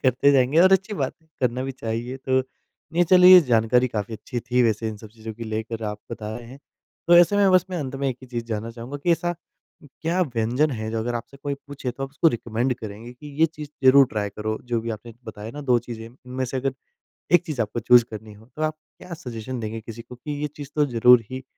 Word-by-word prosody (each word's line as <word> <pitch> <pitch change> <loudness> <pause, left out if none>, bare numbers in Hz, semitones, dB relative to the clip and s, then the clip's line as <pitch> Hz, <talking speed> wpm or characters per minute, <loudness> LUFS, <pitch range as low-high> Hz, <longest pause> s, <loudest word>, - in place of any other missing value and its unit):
करते 130 +3 +4
जाएँगे 135 +4 +3
और 190 +1 +6
अच्छी 190 +3 +2
बात 135 -7 -1
है, - - -30
करना 125 0 0
भी 135 - -4
चाहिए। 120 +2 -4
तो 130 0 +1 0.5
नहीं, 175 +1 +3
चलिए, 180 +1 +9
जानकारी 125 -1 +3
काफ़ी 110 -1 -4
अच्छी 120 +3 -5
थी 125 +1 +1
वैसे 110 -1 +1
इन 110 - -6
सब 110 +1 -12
चीज़ों 110 0 -9
की 115 +1 -7
लेकर 110 +1 -4
आप 105 0 -4
बता 110 0 -5
रहे 120 -1 -10
हैं। 135 +2 -11 0.5
तो 175 - +7
ऐसे 175 +4 +6
में 200 -1 +5
बस 185 -1 +5
मैं 180 - -2
अंत 135 -3 -4
में 140 0 -1
एक 125 - -3
ही - - -10
चीज़ 120 -2 -4
जानना 115 0 -4
चाहूँगा 120 +4 -7
कि 175 - +4
ऐसा 175 +1 -1 0.5
क्या 165 +6 -3
व्यंजन 125 +2 0
है 110 -3 -4
जो 115 - -2
अगर 120 +2 -2
आपसे 120 +4 -6
कोई 140 -1 -2
पूछे, 140 -3 -5
तो 135 +3 -7
आप 135 - -3
उसको 155 +3 +3
रिकमेंड 120 0 -1
करेंगे 110 +2 -8
कि, 125 +4 -13
"ये 165 - +7
चीज़ 150 -2 -9 0.2
ज़रूर 135 +1 +8
ट्राय 105 -3 -3
करो।"? 110 +2 -3
जो 120 -2 -1
भी 115 0 -4
आपने 110 +1 -7
बताया 110 0 -8
ना 145 +4 -8
2 120 - +6
चीज़ें, 115 -1 -8
इनमें 125 +2 -6
से 130 +2 -4
अगर 135 0 -1 0.6
एक 175 0 +6
चीज़ 145 -8 -2
आपको 110 +2 -2
चूज़ 120 +1 +6
करनी 110 0 -8
हो, 110 +2 -17
तो 155 - -6
आप 155 0 0 0.2
क्या 180 - -9
सजेशन 125 -4 -6
देंगे 110 0 -5
किसी 115 +1 -9
को 120 +2 -12
कि, 150 +5 -7
"ये 150 - 0
चीज़ 145 -2 -8
तो 150 -1 +3
ज़रूर 125 -1 +6
ही 130 0 -6
125 Hz, 245 wpm, -24 LUFS, 115-140 Hz, 0.6 s, चलिए